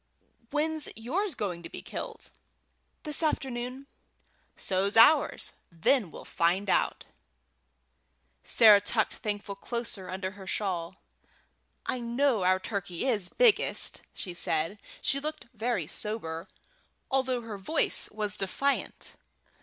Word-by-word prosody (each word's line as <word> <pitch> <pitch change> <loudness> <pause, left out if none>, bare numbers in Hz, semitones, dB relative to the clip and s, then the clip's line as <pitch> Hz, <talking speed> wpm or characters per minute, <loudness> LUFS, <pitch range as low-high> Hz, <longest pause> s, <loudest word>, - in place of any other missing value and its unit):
"When's 310 0 -1
yours 315 - -2
going 180 -6 -3
to - - -9
be - - -9
killed?" - - -7 0.7
"This 300 0 -2
afternoon." 260 -3 -2 0.7
"So's 195 +3 +1
ours. 265 +8 +5 0.2
Then 180 +5 +2
we'll - - -11
find 185 +4 +1
out." - - +1 1.4
Sarah 210 -3 +7
tucked 220 +1 +1
Thankful 205 -1 -2
closer 230 -3 -4
under 185 0 -3
her 190 -1 -12
shawl. 180 -5 -2 0.9
"I 255 - -2
know 240 -1 +1
our 185 +1 +3
turkey 195 -1 -4
is 210 -9 +2
biggest," 480 -4 +3
said 175 +1 -2
she. - - -2
She 275 - -1
looked 305 +2 -5
very 225 -6 -1
sober, 165 -3 -5 0.6
although 260 -2 +1
her 220 -3 -7
voice 310 +11 +3
was 210 -1 -2
defiant. 275 +9 -1
215 Hz, 115 wpm, -29 LUFS, 190-260 Hz, 1.4 s, Sarah